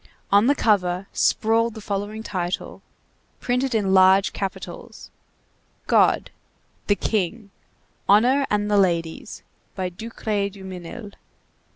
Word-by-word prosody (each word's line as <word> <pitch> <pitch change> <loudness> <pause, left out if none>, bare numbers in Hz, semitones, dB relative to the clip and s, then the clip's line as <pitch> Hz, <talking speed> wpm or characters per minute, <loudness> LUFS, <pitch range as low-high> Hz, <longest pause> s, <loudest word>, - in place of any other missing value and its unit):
On 205 +4 +5
the 285 - +4
cover 185 -6 +1
sprawled 225 +1 +1
the - - -7
following 205 +1 -4
title, 180 -4 -4 0.6
printed 250 0 -1
in 195 -3 +1
large 190 +1 +5
capitals: 195 -2 -7 0.7
GOD; - - +3 0.6
THE 205 - +3
KING; 205 +1 -2 0.6
HONOR 250 +7 +4
AND 210 0 0
THE 205 - +4
LADIES; 175 - -1 0.3
by 185 -2 -2
DUCRAY 210 +1 -3
DUMINIL, 190 -3 -9
1814. 215 -4 -11
205 Hz, 110 wpm, -23 LUFS, 190-225 Hz, 0.7 s, On